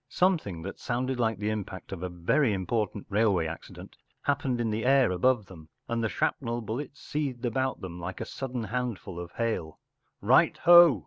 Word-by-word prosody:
Something 155 - +1
that 95 - -6
sounded 125 +1 -2
like 110 -3 +1
the 105 +2 -1
impact 100 -3 -5
of 95 -3 -5
a 90 - -3
very 95 - +2
important 100 +1 -2
railway 100 -5 +2
accident 80 +1 -8 0.3
happened 135 -3 0
in 115 -2 0
the 110 +1 -1
air 135 -5 +4
above 105 +4 +2
them, 80 -5 -13 0.2
and 115 -1 -1
the 110 - +1
shrapnel 120 +1 -1
bullets 130 +7 -5
seethed 135 -5 -3
about 130 +2 -1
them 90 -2 -7
like 90 +2 -5
a - - -3
sudden 130 -3 -4
handful 110 -5 -3
of 90 0 -8
hail 110 -9 -2 0.2
“ - - -48
Right - - +4
ho 175 - +8
115 Hz, 185 wpm, -28 LUFS, 95-130 Hz, 0.3 s, ho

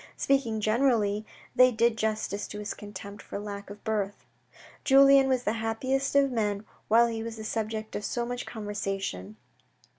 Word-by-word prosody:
Speaking 255 -6 +1
generally, 215 -2 +2 0.3
they 255 0 +7
did 230 0 +2
justice 215 -2 -2
to 210 - -7
his 210 0 -4
contempt 205 0 -9
for - - -7
lack 200 -1 -7
of 205 0 -11
birth. 205 -2 -2 0.6
Julien 275 0 +7
was 255 -1 +1
the 210 - 0
happiest 260 +5 -1
of 280 -1 +4
men, 210 -3 -1 0.2
while 230 +2 +6
he 225 -1 -3
was 225 0 -5
the 220 - -7
subject 220 0 -3
of 205 - -3
so 240 +3 -2
much 245 +1 -5
conversation. 195 - -4
220 Hz, 160 wpm, -28 LUFS, 205-245 Hz, 0.6 s, they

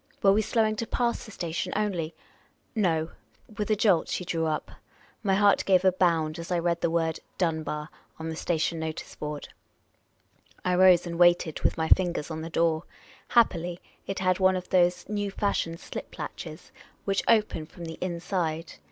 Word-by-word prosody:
Were 195 -1 +7
we 215 - +3
slowing 220 0 +1
to 230 - -3
pass 240 -1 0
the - - -11
station 175 -1 -3
only? 185 -6 -1 0.6
No; 165 -7 +1 0.5
with 210 - -1
a 215 - +4
jolt 200 -5 +3
she 180 - -2
drew 165 -2 0
up. 155 -1 -2 0.5
My 195 -3 +2
heart 200 0 +4
gave 190 -1 +3
a 185 - +7
bound 165 -3 +1
as 170 +3 -7
I 175 - +2
read 170 0 0
the - - +2
word 165 -1 0
" - - -40
Dunbar 160 -3 -1
" - - -36
on 160 - -5
the 160 - -3
station 165 0 -1
notice 160 -1 -5
board. 150 -1 -6 1.2
I 180 - +2
rose 180 -1 +6
and 170 0 -5
waited, 175 -2 +4
with - - +1
my 160 0 0
fingers 175 -3 +2
on 160 0 -4
the 165 - -5
door. 165 0 +1 0.4
Happily 180 -7 +2 0.3
it 195 - -3
had 185 0 +1
one 185 0 +4
of 180 -1 -5
those 180 -1 +2
new 205 -1 -2
fa.shioned 195 -4 -1
.slip - - -8
latches - - -7 0.3
which 195 -1 +1
open 210 -8 +2
from 175 0 -10
the 160 0 -7
inside. 170 -2 -2
175 Hz, 185 wpm, -27 LUFS, 165-195 Hz, 1.2 s, Were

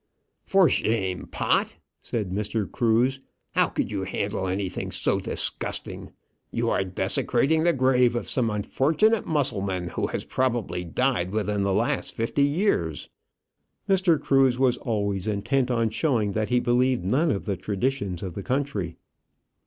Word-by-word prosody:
"For 195 -3 +5
shame, 95 -9 0
Pott," - - 0 0.3
said 105 -6 -3
Mr. 105 +2 -1
Cruse. 120 +3 +2 0.3
"How - - +3
could - - -3
you 100 -2 -2
handle 95 0 -2
anything 95 0 -3
so - - +1
disgusting? - - -3 0.4
You - - -1
are - - +1
desecrating 140 - +1
the 175 - +5
grave 125 -2 +3
of 120 - -3
some 120 -4 +1
unfortunate 150 - +1
Mussulman 100 - 0
who - - -2
has - - -4
probably 120 -8 -1
died 95 0 0
within 105 0 -1
the 100 0 +1
last - - 0
fifty 115 +5 -1
years." 145 - 0 0.8
Mr. 185 -5 +3
Cruse 135 -2 +3
was 130 -2 +2
always 100 -4 -2
intent 125 +6 0
on 115 -3 +1
showing 115 -5 +1
that 110 +1 -1
he 125 0 +3
believed 125 -2 +1
none 140 - +2
of 100 -9 -1
the 100 - -1
traditions 100 -1 -2
of 95 -3 -5
the 100 - -5
country. 115 - -2
115 Hz, 145 wpm, -25 LUFS, 100-135 Hz, 0.8 s, For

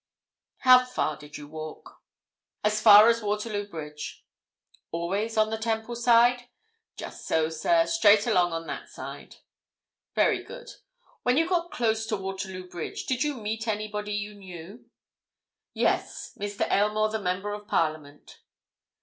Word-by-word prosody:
"How 255 -1 +7
far 250 -11 -2
did 150 +1 -11
you 145 -1 -10
walk?" 155 0 -9 0.6
"As 210 0 +1
far 210 0 +9
as 230 0 +3
Waterloo 210 0 -2
Bridge." 150 -3 -8 0.6
"Always 195 +7 -2
on 215 0 +3
the 220 - -2
Temple 225 +1 -2
side?" 240 +1 +4 0.5
"Just - - -8
so, 160 -1 +1
sir—straight 170 +6 +3
along 180 -7 +2
on 165 0 -4
that 140 -3 -7
side." - - -9 0.8
"Very - - +2
good. - - -10 0.5
When 250 +2 +2
you 325 +1 +3
got 345 -1 0
close 220 -4 0
to 215 -1 -1
Waterloo 190 -1 -6
Bridge, 175 -2 -6
did 255 +1 0
you 295 -1 -1
meet 220 0 -4
anybody 210 -1 -3
you 205 0 -3
knew?" 195 +4 -11 0.9
"Yes." - - -1
"Mr. 205 0 -3
Aylmore, 210 +1 +2
the 220 - -2
Member 190 +3 -2
of 210 0 -8
Parliament." 155 -3 -2
210 Hz, 140 wpm, -27 LUFS, 175-225 Hz, 0.9 s, far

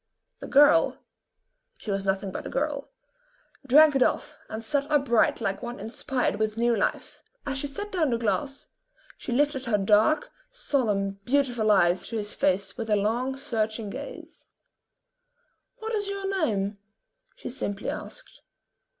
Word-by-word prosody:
The - - -7
girl 290 +3 +5 0.8
she 215 - -5
was 195 0 -2
nothing 190 0 -1
but - - -6
a - - -6
girl 285 0 -2 0.8
drank 295 +3 +7
it 270 - +2
off - - +1
and 220 +1 -6
sat 285 +4 0
upright 275 -7 +3
like 195 0 -2
one 240 -1 -6
inspired 245 +4 -2
with 215 0 -1
new 235 0 +2
life. - - -2 0.2
As 275 -1 -2
she 285 - -2
set 410 +9 -6
down 330 -6 +1
the 235 - +1
glass, 270 +5 -2 0.5
she - - -7
lifted 275 +1 +1
her 225 -3 +2
dark, 215 - +3 0.2
solemn, 210 - -1
beautiful 245 -3 +1
eyes 180 -3 +3
to 230 - -3
his 210 -1 -3
face 195 +3 0
with 225 -2 -4
a 210 - +4
long, 240 +6 0
searching 220 -4 -2
gaze. - - -9 1.3
"What 445 -1 -5
is 410 -2 -1
your 395 -1 -3 0.2
name?" 200 -1 -2 0.6
she - - -7
simply 205 -5 -3
asked. - - -9
240 Hz, 150 wpm, -26 LUFS, 210-285 Hz, 1.3 s, drank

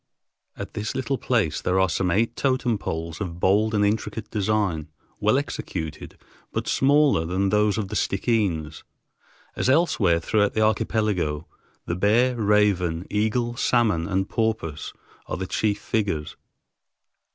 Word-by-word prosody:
At - - -7
this 105 0 -4
little 130 0 -1
place 105 - 0
there 95 +1 +1
are 95 - +4
some 90 +2 0
eight 115 +6 +1
totem 130 -5 0
poles 80 -1 -5
of 85 -3 -4
bold 105 +4 +2
and 105 0 +3
intricate 110 +1 -2
design, 100 -6 0 0.3
well 110 +5 +3
executed, 80 - -5 0.3
but - - -3
smaller 140 - +3
than 95 +4 0
those 105 0 +2
of 105 -4 -3
the 105 - -5
Stickeens. 95 -8 0 0.7
As - - 0
elsewhere 130 - +3
throughout 105 +4 +1
the 110 - +2
archipelago, 105 -8 0 0.4
the - - -2
bear, 115 +7 +3
raven, 100 -6 +2
eagle, 110 +3 0
salmon, 110 -10 +1
and 95 +1 0
porpoise 110 -10 -2 0.4
are - - -3
the 95 - -3
chief 105 +2 0
figures. 100 -9 -2
105 Hz, 140 wpm, -24 LUFS, 90-110 Hz, 0.7 s, are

